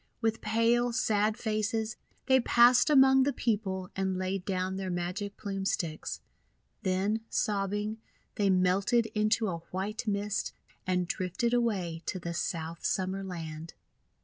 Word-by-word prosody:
With 225 Hz, 0 st, 0 dB
pale, 230 Hz, +3 st, +2 dB
sad 215 Hz, -1 st, +1 dB
faces 220 Hz, 0 st, -1 dB, 0.3 s
they 260 Hz, -1 st, +5 dB
passed 245 Hz, +3 st, +5 dB
among 265 Hz, -2 st, +6 dB
the 280 Hz, +2 st, +3 dB
people 195 Hz, -7 st, -2 dB
and 190 Hz, -1 st, -1 dB
laid 185 Hz, 0 st, -2 dB
down 185 Hz, -1 st, -1 dB
their 190 Hz, -1 st, -3 dB
Magic 180 Hz, +3 st, -3 dB
Plume 195 Hz, -2 st, -4 dB
Sticks. 170 Hz, -5 st, -2 dB, 0.6 s
Then, 195 Hz, +4 st, 0 dB
sobbing, 205 Hz, +1 st, -1 dB, 0.3 s
they 200 Hz, -1 st, +1 dB
melted 190 Hz, +5 st, +3 dB
into 215 Hz, +1 st, +2 dB
a 170 Hz, -3 st, -3 dB
white 210 Hz, +6 st, -4 dB
mist, 205 Hz, 0 st, -1 dB, 0.3 s
and 180 Hz, -1 st, +1 dB
drifted 185 Hz, +8 st, -1 dB
away 195 Hz, -9 st, 0 dB
to -, -, -2 dB
the 170 Hz, -1 st, -5 dB
South 165 Hz, 0 st, -3 dB
Summer 190 Hz, +1 st, -1 dB
Land. 165 Hz, -3 st, -7 dB
200 Hz, 135 wpm, -30 LUFS, 185-225 Hz, 0.6 s, among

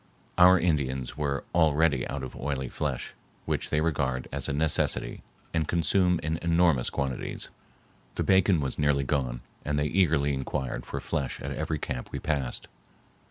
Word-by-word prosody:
Our 90 Hz, +1 st, +8 dB
Indians 65 Hz, -7 st, 0 dB
were 70 Hz, -2 st, -1 dB
already 80 Hz, -4 st, +3 dB
out 70 Hz, -1 st, -4 dB
of 65 Hz, -, -7 dB
oily 65 Hz, -2 st, -3 dB
flesh, -, -, -3 dB, 0.3 s
which -, -, -1 dB
they 75 Hz, -, +1 dB
regard 70 Hz, -5 st, 0 dB
as -, -, -2 dB
a -, -, 0 dB
necessity 75 Hz, +1 st, 0 dB, 0.3 s
and 80 Hz, -2 st, +1 dB
consume 90 Hz, +1 st, +2 dB
in 80 Hz, +1 st, -1 dB
enormous 85 Hz, -6 st, +3 dB
quantities. 65 Hz, -2 st, -3 dB, 0.7 s
The -, -, 0 dB
bacon 95 Hz, -3 st, +4 dB
was 65 Hz, -2 st, -3 dB
nearly 75 Hz, -1 st, +3 dB
gone 65 Hz, -4 st, -1 dB, 0.2 s
and 75 Hz, 0 st, -1 dB
they 75 Hz, -, +1 dB
eagerly 75 Hz, -4 st, +2 dB
inquired 65 Hz, -1 st, -3 dB
for -, -, -4 dB
flesh 70 Hz, -6 st, -3 dB
at -, -, -5 dB
every 80 Hz, -, -2 dB
camp 65 Hz, -3 st, -4 dB
we -, -, -3 dB
passed. 70 Hz, -5 st, -2 dB
75 Hz, 160 wpm, -28 LUFS, 65-80 Hz, 0.7 s, Our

